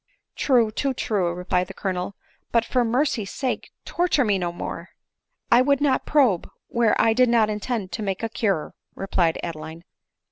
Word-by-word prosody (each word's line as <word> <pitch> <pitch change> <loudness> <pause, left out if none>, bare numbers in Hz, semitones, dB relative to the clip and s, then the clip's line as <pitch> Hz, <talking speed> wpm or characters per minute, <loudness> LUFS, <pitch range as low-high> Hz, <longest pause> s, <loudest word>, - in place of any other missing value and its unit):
True— 240 -6 +3
too 270 +4 -1
true! 200 -8 0
" - - -7
replied 180 0 -1
the 195 - -10
Colonel; 185 0 -3 0.2
" - - -42
but 230 -1 +2
for 250 0 +1
mer 245 +6 +2
cy's 215 -8 -2
sake, 260 -3 -3 0.2
torture 345 -6 +1
me 200 -3 +2
no 175 -1 -2
more." 170 0 -6 0.6
"I 240 +1 +7
would 280 +1 +3
not 280 -3 +1
probe 255 - +3 0.2
where 235 -2 +2
I 225 - +4
did 250 +1 +4
not 225 -2 +3
intend 210 -2 -3
to 225 - -4
make 195 0 -3
a 225 - -1
cure," 200 -8 -1 0.2
replied 180 -4 0
Adeline. 160 0 -7
215 Hz, 185 wpm, -24 LUFS, 185-250 Hz, 0.6 s, I